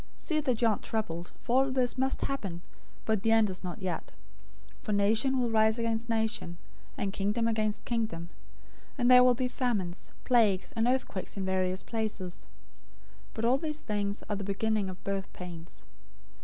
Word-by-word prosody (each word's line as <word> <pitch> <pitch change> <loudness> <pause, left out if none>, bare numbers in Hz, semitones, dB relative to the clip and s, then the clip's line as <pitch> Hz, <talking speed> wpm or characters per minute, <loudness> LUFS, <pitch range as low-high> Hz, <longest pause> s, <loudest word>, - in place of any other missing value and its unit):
See 315 -3 0
that 255 -6 0
you - - +6
aren't 215 - +1
troubled, 175 -6 -3
for 255 +2 +3
all - - -3
this 255 -2 +1
must 265 +1 0
happen, 195 -11 -3 0.4
but 220 -3 +1
the 225 - +2
end 220 -3 +4
is 185 - -2
not 180 +2 -6
yet. 180 -3 -2 0.7
024:007 - - -27
For 210 - -1
nation 220 +6 +3
will 245 -2 +1
rise 220 0 +4
against 230 0 -1
nation, 220 -6 -1 0.4
and 195 -1 -2
kingdom 210 +4 0
against 215 -2 0
kingdom; 215 -8 -2 0.7
and 245 +1 +4
there 250 0 +9
will 250 -1 +5
be 255 +1 0
famines, 210 -9 -2
plagues, 215 -7 +3
and 225 0 +1
earthquakes 245 -7 -1
in 195 - -2
various 185 0 0
places. 215 -5 -4
024:008 100 0 -28
But 230 - -1
all 255 +3 +4
these 305 -1 -3
things 205 -1 -2
are 210 - -1
the 200 - -4
beginning 205 0 0
of 185 0 -9
birth 195 -1 -3
pains. 175 -2 -9
215 Hz, 180 wpm, -30 LUFS, 190-235 Hz, 0.7 s, there